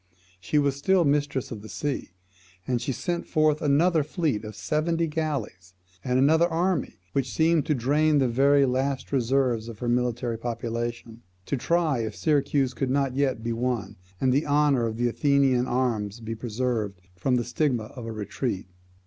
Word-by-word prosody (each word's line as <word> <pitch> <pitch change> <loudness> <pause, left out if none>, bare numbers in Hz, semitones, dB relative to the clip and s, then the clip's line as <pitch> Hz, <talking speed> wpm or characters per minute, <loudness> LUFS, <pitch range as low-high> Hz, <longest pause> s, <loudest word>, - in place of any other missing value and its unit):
She 90 +11 -1
still 175 +7 +2
was 140 - +3
mistress 145 -3 -1
of 110 -3 -6
the 110 - -11
sea, 145 -2 -3 0.6
and 125 -2 -1
she - - -2
sent 170 +7 -3
forth 155 0 +2
another 155 +3 +3
fleet 150 - -1
of 105 -1 -8
seventy 160 +8 0
galleys, 145 - -4 0.3
and 125 0 +1
another 160 +6 +4
army, 175 +1 0 0.2
which 135 -3 -1
seemed 160 +4 +2
to 150 - +2
drain 145 +5 +2
the 135 -2 +3
very 140 +3 +4
last 130 +1 -1
reserves 125 -3 +1
of 115 -2 -8
her 120 - -4
military 120 -1 0
population, 115 0 -4 0.2
to - - -1
try 160 0 +1
if 110 -2 -3
Syracuse 140 -3 +1
could 130 0 -2
not 135 -1 0
yet 130 -5 0
be 120 0 -1
won, 120 -4 -2 0.2
and 130 -1 +2
the 145 +4 +1
honour 145 -4 +3
of 110 0 -4
the 120 +1 +1
Athenian 135 -1 +2
arms 115 -4 -1
be 115 0 -5
preserved 115 -3 -2 0.2
from 125 +8 0
the 120 - +1
stigma 125 -1 0
of 120 +1 -9
a - - -4
retreat. 105 0 -3
130 Hz, 175 wpm, -26 LUFS, 115-145 Hz, 0.6 s, another